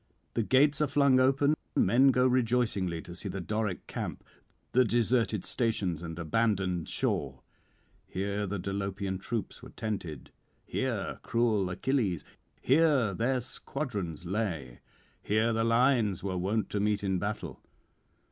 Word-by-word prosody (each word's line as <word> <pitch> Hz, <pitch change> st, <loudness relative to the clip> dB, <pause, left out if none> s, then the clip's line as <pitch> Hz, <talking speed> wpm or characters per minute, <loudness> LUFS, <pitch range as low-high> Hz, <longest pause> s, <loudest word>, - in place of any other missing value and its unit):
The -, -, +1 dB
gates 140 Hz, +7 st, +3 dB
are 150 Hz, -, +3 dB
flung 140 Hz, -1 st, +4 dB
open; 135 Hz, +3 st, +4 dB, 0.2 s
men 120 Hz, +8 st, +5 dB
go 125 Hz, -1 st, +3 dB
rejoicingly 115 Hz, -9 st, +1 dB
to 85 Hz, -, -9 dB
see 95 Hz, +3 st, -4 dB
the 95 Hz, +1 st, -4 dB
Doric 105 Hz, 0 st, -2 dB
camp, -, -, -5 dB, 0.5 s
the 130 Hz, -, +5 dB
deserted 115 Hz, -3 st, +1 dB
stations 100 Hz, -9 st, -1 dB
and 80 Hz, -1 st, -6 dB
abandoned 90 Hz, 0 st, 0 dB
shore. 65 Hz, -2 st, -2 dB, 0.6 s
Here 100 Hz, +2 st, -2 dB
the 100 Hz, +2 st, -2 dB
Dolopian 100 Hz, 0 st, -3 dB
troops 110 Hz, +2 st, -4 dB
were -, -, -11 dB
tented, 90 Hz, -, -5 dB, 0.3 s
here -, -, -2 dB
cruel 110 Hz, -5 st, +1 dB
Achilles; 100 Hz, -, 0 dB, 0.3 s
here 140 Hz, -7 st, +3 dB
their 125 Hz, +6 st, +1 dB
squadrons 105 Hz, -, -4 dB
lay; 85 Hz, -, -3 dB, 0.4 s
here 110 Hz, +2 st, +1 dB
the 115 Hz, 0 st, +1 dB
lines 115 Hz, -4 st, +2 dB
were 95 Hz, -2 st, -2 dB
wont 100 Hz, +5 st, -1 dB
to 105 Hz, -, -1 dB
meet 105 Hz, 0 st, +1 dB
in 95 Hz, -2 st, 0 dB
battle. 105 Hz, +3 st, -4 dB
105 Hz, 135 wpm, -30 LUFS, 95-125 Hz, 0.6 s, men